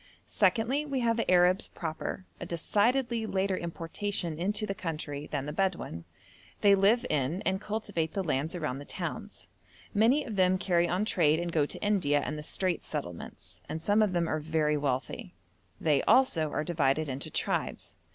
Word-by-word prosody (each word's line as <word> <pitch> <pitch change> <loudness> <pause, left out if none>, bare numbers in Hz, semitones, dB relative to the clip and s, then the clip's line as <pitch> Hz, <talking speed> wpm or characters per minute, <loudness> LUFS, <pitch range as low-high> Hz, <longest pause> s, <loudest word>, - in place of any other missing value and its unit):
Secondly, 255 +6 +2
we 275 -4 -2
have 230 -1 +2
the 230 - -1
Arabs 180 +1 +4
proper, 165 +3 -5
a - - -5
decidedly 230 +7 +1
later 190 -1 0
importation 170 0 -3
into 205 +4 0
the 195 - -2
country 150 -5 -5
than 140 -2 -3
the 150 - -4
Bedouin. 175 - -2 0.6
They 200 -1 +6
live 205 +6 +4
in 150 +5 0
and 190 +1 0
cultivate 205 -7 -2
the 195 - -1
lands 155 +1 -1
around 150 -6 -3
the 145 - -9
towns; - - -6 0.4
many 230 +8 +4
of 220 -5 -5
them 185 0 +4
carry 175 -3 +2
on 185 +5 0
trade 160 -6 +3
and 175 0 -2
go 150 -3 +2
to - - -7
India 185 -9 +2
and 150 +1 -3
the 150 - -5
Straits 180 +3 -2
Settlements, 115 - -6
and 160 - -3
some 205 +6 +3
of 210 -3 +2
them 170 -1 +1
are 155 - -1
very 155 -1 +1
wealthy. 145 +5 -2 0.4
They 150 -4 +3
also 165 - +4
are 150 - -1
divided 155 -2 +1
into 135 0 -4
tribes. - - -2
175 Hz, 175 wpm, -29 LUFS, 155-205 Hz, 0.6 s, They